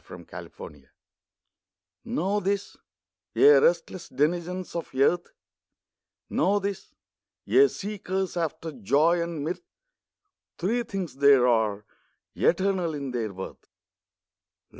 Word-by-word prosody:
THREE - - -11 0.3
THINGS - - -11 1.2
Know 210 -4 0
this, 200 0 -2 0.6
ye 415 - +6
restless 455 - +2
denizens 175 +7 -1
of 170 - -4
earth, 170 +6 +2 1.0
Know 200 +2 +2
this, 200 0 -5 0.5
ye 410 +2 +6
seekers 195 - -4
after 165 -1 -3
joy 150 - +2
and 170 -3 -4
mirth, 170 +4 -3 1.0
Three 225 +8 0
things 190 - -5
there 140 -3 +6
are, 110 -3 +1 0.5
eternal 185 -3 +1
in 140 -2 -5
their 115 -4 -2
worth. 95 0 -9
170 Hz, 100 wpm, -26 LUFS, 140-195 Hz, 1.2 s, ye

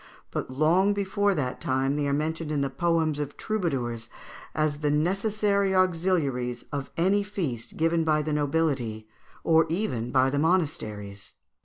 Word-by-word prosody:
But - - -3
long 165 +9 +3
before 200 0 +1
that 130 -5 -2
time 135 +2 0
they 145 -1 0
are - - 0
mentioned 155 +2 -1
in 145 -2 0
the 135 -1 -1
poems 160 0 +1
of 145 -1 -4
troubadours 125 - -2 0.5
as 155 -2 0
the 150 -1 0
necessary 195 +5 +1
auxiliaries 160 -10 +1
of 140 -2 -4
any 190 +5 +3
feast 170 - -4
given 165 +1 +2
by 155 -1 +2
the 155 0 -2
nobility, 140 -7 0 0.4
or 160 0 +4
even 145 - -1
by 130 +1 +3
the 145 - 0
monasteries. 110 - -1
155 Hz, 150 wpm, -27 LUFS, 135-180 Hz, 0.5 s, or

